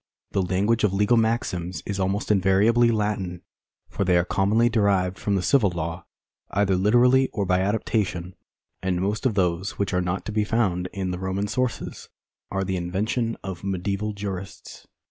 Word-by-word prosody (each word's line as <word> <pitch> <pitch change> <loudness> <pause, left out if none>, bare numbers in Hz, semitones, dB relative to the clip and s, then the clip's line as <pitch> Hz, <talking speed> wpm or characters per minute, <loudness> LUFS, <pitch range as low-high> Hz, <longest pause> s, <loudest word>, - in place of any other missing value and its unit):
The 95 - +1
language 100 +5 +1
of 100 -2 +2
legal 105 +4 +3
maxims 95 -7 -1
is 100 -1 -3
almost 95 +3 0
invariably 105 +5 +4
Latin, 105 -5 -1 0.4
for - - -2
they 90 -2 +3
are 85 - +2
commonly 105 +5 +2
derived 100 -5 +1
from 100 - 0
the 95 - 0
civil 105 +2 +4
law, 85 0 -5 0.4
either 100 -1 +1
literally 120 +7 +4
or 100 -3 -1
by 90 0 +2
adaptation, 95 -3 -1 0.5
and 95 -1 0
most 105 +6 0
of 115 - -2
those 90 0 0
which 100 -1 -1
are 90 - +2
not 90 +2 -2
to - - -4
be 105 0 +1
found 95 -5 0
in 95 -2 -3
the 90 - -4
Roman 95 +2 -2
sources 125 +3 -3 0.4
are 95 0 -1
the 95 -1 -2
invention 105 +7 -1
of 95 -2 -6
medieval 100 +2 -2
jurists. 100 -2 -7
100 Hz, 170 wpm, -24 LUFS, 90-105 Hz, 0.5 s, invariably